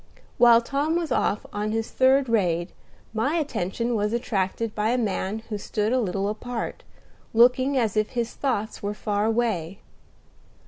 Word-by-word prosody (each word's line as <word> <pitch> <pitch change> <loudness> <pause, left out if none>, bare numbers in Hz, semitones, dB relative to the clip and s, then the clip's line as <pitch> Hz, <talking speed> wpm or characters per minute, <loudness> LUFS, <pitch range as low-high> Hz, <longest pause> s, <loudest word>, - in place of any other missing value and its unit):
While 235 -1 +7
Tom 285 +6 0
was 335 -4 -1
off 210 - 0
on 210 +1 -2
his 225 0 -2
third 265 +1 +4
raid, 180 -6 +1 0.4
my 265 +8 0
attention 240 - -1
was 210 0 0
attracted 225 -2 -1
by 210 +1 0
a 245 - +2
man 215 -1 -2
who 210 -2 -3
stood 210 +3 -1
a 255 - +3
little 195 -1 -1
apart, 230 +3 -4 0.5
looking 255 +4 +4
as 225 -5 +1
if 215 0 +1
his 235 -2 -2
thoughts 225 -6 -2
were 205 +1 -3
far 205 0 -1
away. 220 -6 0
225 Hz, 155 wpm, -25 LUFS, 205-245 Hz, 0.5 s, While